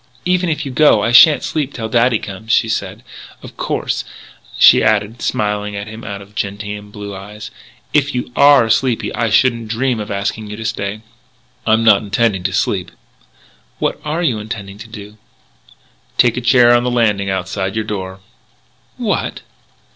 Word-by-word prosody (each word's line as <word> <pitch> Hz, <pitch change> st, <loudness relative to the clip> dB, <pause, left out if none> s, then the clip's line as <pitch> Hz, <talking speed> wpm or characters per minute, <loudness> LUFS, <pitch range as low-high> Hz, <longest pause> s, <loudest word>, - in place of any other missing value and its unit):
"Even 180 Hz, 0 st, +1 dB
if 150 Hz, -1 st, -2 dB
you 135 Hz, -, -5 dB
go 130 Hz, -6 st, +4 dB
I 115 Hz, -, +1 dB
shan't 145 Hz, +5 st, +7 dB
sleep 145 Hz, -3 st, -3 dB
till 115 Hz, -2 st, -4 dB
daddy 115 Hz, +1 st, +2 dB
comes," 105 Hz, +3 st, -7 dB
she 115 Hz, -, +3 dB
said. 110 Hz, -, -4 dB, 0.4 s
"Of -, -, -11 dB
course," -, -, -2 dB, 0.5 s
she -, -, +7 dB
added, 110 Hz, +1 st, 0 dB
smiling 105 Hz, -1 st, -2 dB
at 100 Hz, 0 st, -5 dB
him 110 Hz, +2 st, -10 dB
out 100 Hz, -1 st, -6 dB
of 100 Hz, +1 st, -20 dB
gentian 105 Hz, +1 st, -5 dB
blue 105 Hz, -1 st, -8 dB
eyes, 105 Hz, +2 st, -9 dB, 0.4 s
"if 140 Hz, -2 st, +1 dB
you 125 Hz, 0 st, -3 dB
are 140 Hz, -5 st, +6 dB
sleepy 120 Hz, +1 st, 0 dB
I 115 Hz, -2 st, -1 dB
shouldn't 115 Hz, 0 st, +2 dB
dream 120 Hz, +1 st, -1 dB
of 105 Hz, +1 st, -6 dB
asking 105 Hz, +2 st, -3 dB
you 105 Hz, -, -7 dB
to 115 Hz, -, -7 dB
stay." 105 Hz, -1 st, -3 dB, 0.7 s
"I'm 110 Hz, +1 st, +3 dB
not 105 Hz, -3 st, +5 dB
intending 105 Hz, -1 st, 0 dB
to 95 Hz, -, +1 dB
sleep." -, -, -1 dB, 0.9 s
"What -, -, -2 dB
are 155 Hz, +3 st, -2 dB
you 115 Hz, -10 st, 0 dB
going 110 Hz, -, -12 dB, 0.3 s
to 110 Hz, +2 st, -11 dB
do?" 105 Hz, -1 st, -11 dB, 1.0 s
"Take 120 Hz, -2 st, +4 dB
a 125 Hz, -, -3 dB
chair 120 Hz, 0 st, +5 dB
on 120 Hz, 0 st, +3 dB
the 125 Hz, -, 0 dB
landing 105 Hz, -5 st, +1 dB
outside 95 Hz, +1 st, -3 dB
your 110 Hz, -1 st, -2 dB
door." 95 Hz, -2 st, -5 dB, 0.8 s
"What!" -, -, -2 dB
110 Hz, 170 wpm, -17 LUFS, 105-120 Hz, 1.0 s, shan't